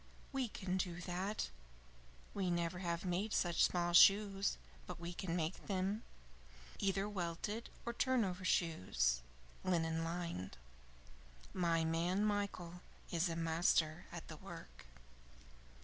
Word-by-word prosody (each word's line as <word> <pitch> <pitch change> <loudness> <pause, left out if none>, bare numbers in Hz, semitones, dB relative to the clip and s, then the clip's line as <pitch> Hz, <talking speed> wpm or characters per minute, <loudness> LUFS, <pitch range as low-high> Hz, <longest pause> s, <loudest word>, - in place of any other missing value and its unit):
"We 270 -2 0
can 190 -3 -2
do 175 -2 -2
that. 185 - -2 0.8
We 190 -3 0
never 170 0 0
have 170 -1 -2
made 185 +4 0
such 175 -2 +3
small 175 -1 0
shoes, 195 +2 +6 0.3
but - - -6
we 170 +1 -5
can 175 -1 -2
make 165 +1 -2
them; 195 +2 0 0.8
either 195 +1 +1
welted 205 +3 -3 0.2
or 235 - -2
turnover 225 -8 +1
shoes, 125 - +2 0.4
linen 165 -2 +1
lined. 165 - -4 1.0
My 165 -2 +2
man, 175 +5 +1
Michael, 195 -4 -2 0.3
is 170 +1 +2
a 165 - -2
master 165 0 +2
at - - -7
the - - -8
work." - - -10
175 Hz, 120 wpm, -38 LUFS, 165-195 Hz, 1.0 s, shoes